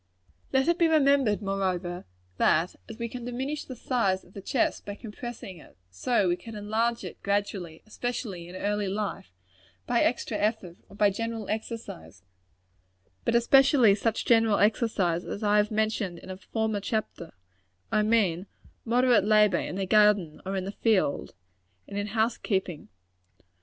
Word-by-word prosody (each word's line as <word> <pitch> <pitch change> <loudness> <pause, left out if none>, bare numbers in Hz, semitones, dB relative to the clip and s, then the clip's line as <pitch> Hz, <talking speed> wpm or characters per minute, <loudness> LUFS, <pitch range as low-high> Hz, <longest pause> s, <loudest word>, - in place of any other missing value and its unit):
Let 265 +2 +2
it 340 +1 +2
be 335 - +5
remembered, 275 -9 +3
moreover, 185 -3 -2 0.3
that 170 - +2
as 225 - -8
we 235 0 -3
can 245 +1 -7
diminish 265 +5 -4
the 255 - -8
size 220 -7 0
of 180 - -21
the 200 - -8
chest 240 +5 0
by 205 - -6
compressing 220 -3 -8
it, 150 - -18
so 200 - +1
we 175 - +1
can 225 +5 -10
enlarge 220 +3 -1
it, - - -8
gradually 200 -5 -2
especially 215 -6 -5
in 180 - -10
early 205 +1 -1
life 200 - -4 0.5
by 240 -1 +2
extra 235 -2 0
effort; 205 -5 -1
or 200 - -14
by 205 0 +3
general 225 0 -4
exercise; 215 - -6 1.0
but 230 - +1
especially 255 -2 +5
such 215 +2 -1
general 225 -3 +4
exercise 200 -5 +1
as 205 - -6
I 210 0 +3
have 210 0 +3
mentioned 215 -4 -1
in 185 - -10
a 185 - -7
former 220 +2 -2
chapter 205 -5 -4 0.6
I 215 - +3
mean, 205 -5 +1 0.4
moderate 240 -2 +3
labor 210 -1 +4
in - - -4
the 195 0 -1
garden 205 -5 +3
or 195 - -2
in 185 -1 -2
the 195 - -4
field, 205 - 0 0.5
and - - -8
in 205 0 -2
house 225 +2 0
keeping. 190 -6 -2
210 Hz, 160 wpm, -27 LUFS, 190-230 Hz, 1.0 s, be